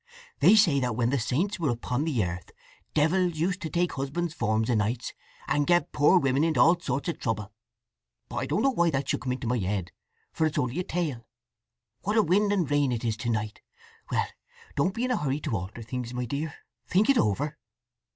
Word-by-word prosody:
"They - - +7
say 170 -10 +5
that 125 -4 -1
when 120 +1 +1
the 140 - +1
saints 170 - -1
were 160 -4 +1
upon 125 +4 -1
the 125 - +1
earth 90 0 -6 0.5
devils 175 +3 +2
used 180 +5 -1
to 160 - -3
take 175 +1 0
husbands' 150 +5 -3
forms 110 -3 0
o' - - +3
nights, 110 +3 -1 0.3
and 145 -1 +1
get 175 0 +3
poor 150 +6 +5
women 135 -2 +2
into 160 -1 +1
all 170 +1 +5
sorts 140 -4 -2
of 165 - -4
trouble. 110 -3 -2 0.8
But - - -7
I - - -1
don't 210 - 0
know 270 - +4
why 170 -8 +2
that 135 -2 -2
should - - 0
come 130 -1 -1
into 125 -1 -5
my 120 +1 +1
head, 95 -2 -2 0.4
for 160 - +2
it 155 - -4
is - - -5
only 125 +6 0
a - - 0
tale… 155 -11 -3 0.7
What 210 +3 0
a 220 - +6
wind 200 +4 +2
and 185 -6 +1
rain 145 -2 +2
it 120 0 -2
is 110 -2 0
to 120 +1 -3
night! 110 -2 -2 0.5
Well—don't 170 +7 -3
be 240 - 0
in 255 - -1
a - - +2
hurry 140 0 -1
to 145 -7 -2
alter 100 +5 -5
things, 125 +1 -5
my 125 0 -2
dear. 145 +6 -3 0.4
Think 195 +4 +3
it 275 -3 +4
over." 140 +9 0
140 Hz, 220 wpm, -27 LUFS, 120-175 Hz, 0.8 s, They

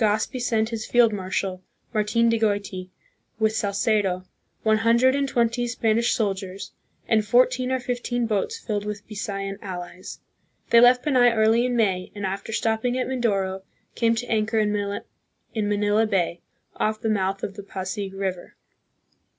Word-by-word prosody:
pose 215 - +5 0.2
Legazpi 255 -2 -6
sent 220 -2 +1
his 225 -2 -4
field 240 -3 +4
marshal, 190 -1 -3 0.3
Martin 220 +2 +2
de 230 -1 +2
Goiti, 200 -4 -1 0.5
with 220 0 +1
Salcedo, 200 -3 0 0.4
one 220 0 +3
hundred 235 +3 +4
and 280 -1 0
twenty 240 0 +1
Spanish 230 0 +1
soldiers, 195 -3 -3 0.4
and 220 -2 +3
fourteen 250 +3 +3
or 260 - +1
fifteen 245 -1 -2
boats 225 - -1
filled 210 - -3
with 210 -1 -6
Bisayan 195 -2 -4
allies. 180 -1 -7 0.5
They 235 - +8
left 245 +1 +6
Panay 250 -5 +4
early 225 +3 +3
in 245 - -1
May, 190 -5 0
and, 205 -1 -4
after 195 +3 -4
stopping 225 +2 0
at 255 - 0
Mindoro, 200 -7 -1 0.3
came 230 -1 +2
to 235 +2 -3
anchor 220 -1 0
in 210 -1 +2
Manila 205 +1 -2
Bay, 175 -4 0 0.4
off 215 0 0
the 220 - -3
mouth 195 -2 0
of 195 - -3
the 205 - -8
Pasig 195 0 -5
River. 190 -2 -4
215 Hz, 155 wpm, -24 LUFS, 200-235 Hz, 0.5 s, They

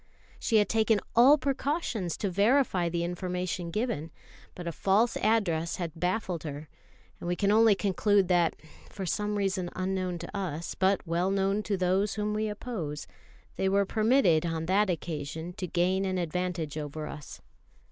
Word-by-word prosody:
She 230 - 0
had 210 -1 +5
taken 220 -1 +2 0.2
all 260 +6 +7
precautions 270 - -2
to 200 - -2
verify 200 -3 +2
the 170 0 -1
information 180 0 -3
given, 170 - -2 0.5
but 175 - -7
a - - -1
false 200 +8 +2
address 180 -7 +1
had 170 -3 -4
baffled 180 0 -1
her; 150 0 -7 0.5
and - - -6
we 175 - 0
can 200 +2 +1
only 220 -1 +6
conclude 200 0 +2
that, 175 -2 +2 0.3
for 195 - -6
some 210 +3 -1
reason 190 -3 -1
unknown 185 -1 -2
to 170 +4 -8
us, 170 -4 -3
but 190 +1 +1
well 170 +2 0
known 195 +1 +1
to 210 -2 -2
those 185 +3 +1
whom 210 0 -1
we 215 0 -1
oppose, 200 -9 -5 0.5
they 190 - +1
were 200 +1 +3
permitted 215 - +3
on 165 -1 -2
that 195 +3 +2
occasion 160 0 -4
to 180 - -3
gain 180 +3 +1
an 185 -1 -1
advantage 175 -3 -2
over 150 +1 -5
us. 150 -2 -9
185 Hz, 165 wpm, -29 LUFS, 170-210 Hz, 0.5 s, all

